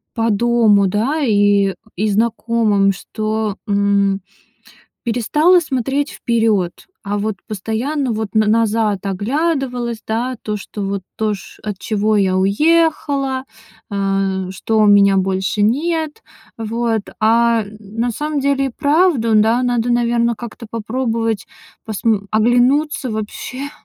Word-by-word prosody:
по 225 0 +1
дому, 215 -2 +3
да, 240 +11 0
и 205 -5 +3 0.2
и 210 +4 0
знакомым, 220 -2 +2
что, 215 +1 -3
м, 200 -1 +2 0.8
перестала 300 +10 +3
смотреть 275 -1 -1
вперёд, 220 -7 +1 0.3
а 205 0 -3
вот 210 -1 -2
постоянно 230 +6 -2
вот 220 -1 -2
н - - +6
назад 215 -3 +1
оглядывалась, 245 - -1
да, 240 +3 -2
то, 210 -1 -3
что 205 +1 -7
вот 195 0 -3
то, 215 -1 0
чт 195 - -12
от 210 -3 -4
чего 215 +1 0
я 190 -2 +2
уехала. 275 - +1 0.5
Э, 195 -2 -1
что 205 +4 -1
у 210 - +5
меня 200 -1 +5
больше 190 +2 0
нет. 315 - 0 0.4
Вот. 225 0 -1 0.2
А 230 +1 +3
н 210 +1 -12
на 225 +4 -3
самом 300 +4 -2
деле 275 0 +1
и - - -3
правда, 285 -3 +2
да. 225 +4 +3
Надо, 245 -1 0
наверное, 235 0 +1
как-то 230 0 -9
попробовать 225 -1 -2 0.4
посм 215 -1 0
оглянуться 245 +5 +2
вообще 250 +6 -5
225 Hz, 125 wpm, -18 LUFS, 205-250 Hz, 0.8 s, н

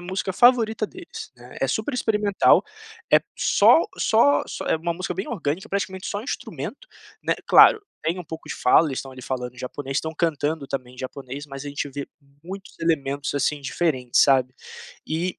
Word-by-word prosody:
música 190 +1 -3
favorita 225 -1 +4
deles, 345 - -10
né, - - -14
é - - +2
super 290 - -1
experimental, 210 -4 +3 0.5
é - - +8
p - - -36
só 330 - +5 0.2
só 235 +6 +4
só - - -6
é - - +2
uma 170 +2 -2
música 180 +1 -3
bem 190 +3 -4
orgânica, 185 -1 -3
praticamente 190 -1 -3
só 205 +1 -3
instrumento, - - -6 0.3
né, - - +1
claro, 440 -4 +7 0.2
tem 165 +3 -1
um 180 - -6
pouco 160 +1 -9
de - - -3
fala, 155 +5 +4
eles 135 - -3
estão 135 -1 -7
ali 130 - -11
falando 125 -1 -4
japonês, 135 +2 -5
estão 160 0 -4
cantando 155 -3 -1
também 125 -2 -5
em 125 - -19
japonês, 135 +2 -7
mas 135 0 -8
a 145 - -5
gente 145 0 -3
vê 140 +1 -5 0.4
muitos 190 +3 -9
elementos, 145 -4 -1
assim, 145 +1 0
diferentes, 130 -4 +1
sabe. 130 -2 +3 0.5
E 170 +3 -2
160 Hz, 185 wpm, -24 LUFS, 135-195 Hz, 0.5 s, é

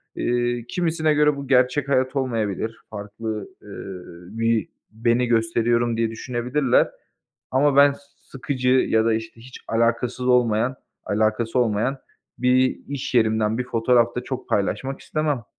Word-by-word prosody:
Eee, 120 -1 -1
kimisine 160 -3 +1
göre 150 -1 +3
bu 140 -1 -7
gerçek 130 +2 +2
hayat 130 0 +1
olmayabilir, 115 -4 -2
farklı, 105 0 -6
eee, - - -17 0.7
bir 115 -1 +1 0.2
beni 115 +2 +1
gösteriyorum 115 0 +1
diye 115 -1 0
düşünebilirler. 125 +3 +1 0.6
Ama 135 +1 +2
ben 140 0 +6 0.4
sıkıcı 130 -1 -3
ya 115 -3 +3
da 115 - +2
işte 110 +1 -6
hiç 125 +2 -12
alakasız 115 +2 0
olmayan 125 0 +2 0.3
alakası 110 +3 0
olmayan 120 +3 +1 0.4
bir 130 +1 +2
iş 140 -2 -5
yerimden 110 -1 +2
bir 125 - -1
fotoğraf 120 0 +2
da 125 - -2
çok 130 -1 -6
paylaşmak 135 +7 -1
istemem. 150 -6 -2
120 Hz, 130 wpm, -23 LUFS, 115-130 Hz, 0.7 s, ben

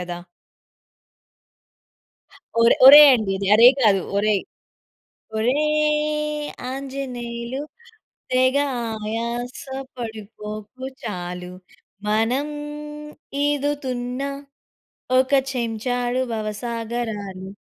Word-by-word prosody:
కదా! 175 -1 -5 2.4
ఓరే 230 0 +6
ఓరేయ్ 290 +2 +11
అండి 215 -4 -1
ఇది. 195 0 -3
అరేయ్ 240 +4 +8
కాదు 200 -4 +4 0.2
ఓరేయ్. 205 -1 +2 1.0
ఓరేయ్ 300 +3 0 0.2
ఆంజనేయులు 260 -2 -5 0.7
తెగ 255 +1 +3 0.4
ఆయాస 230 +3 -4 0.3
పడిపోకు 215 +1 -7 0.2
చాలు. 180 -3 -5 0.6
మనం 225 +7 +1 1.0
ఈదుతున్న 270 -3 -2 1.0
ఒక 260 +1 +1 0.2
చెంచాడు 245 +1 -1
భవసాగరాలు. 215 -3 -4
240 Hz, 65 wpm, -22 LUFS, 215-265 Hz, 2.4 s, ఓరేయ్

